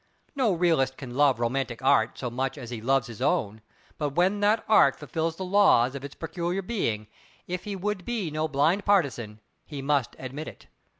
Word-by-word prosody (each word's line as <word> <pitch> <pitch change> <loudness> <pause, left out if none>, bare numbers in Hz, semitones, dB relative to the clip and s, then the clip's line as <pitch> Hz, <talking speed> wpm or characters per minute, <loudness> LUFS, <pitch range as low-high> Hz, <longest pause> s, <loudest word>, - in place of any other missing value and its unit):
No 255 -6 +2
realist 160 -7 +1
can 130 -3 -8
love 140 -3 +3
romantic 120 0 -2
Art 110 -3 +3
so 125 -2 -4
much 130 +4 -2
as 120 -4 -8
he 115 -3 -5
loves 135 +2 +2
his 120 -1 -10
own, 125 - 0 0.4
but 145 -2 -2
when 190 +4 +2
that 210 +2 +2
Art 140 -11 +5
fulfils 160 +3 -3
the 190 - -5
laws 180 -11 +4
of 140 -1 -7
its 140 - -8
peculiar 170 +3 -3
being, 115 - -2 0.4
if 180 0 -5
he 205 -1 -4
would 195 0 -3
be 215 -7 -3
no 155 +1 -1
blind 155 +7 +2
partisan, 125 - 0 0.2
he 145 -3 -8
must 140 -3 0
admit 135 +4 -6
it. - - -11
145 Hz, 190 wpm, -27 LUFS, 130-180 Hz, 0.4 s, Art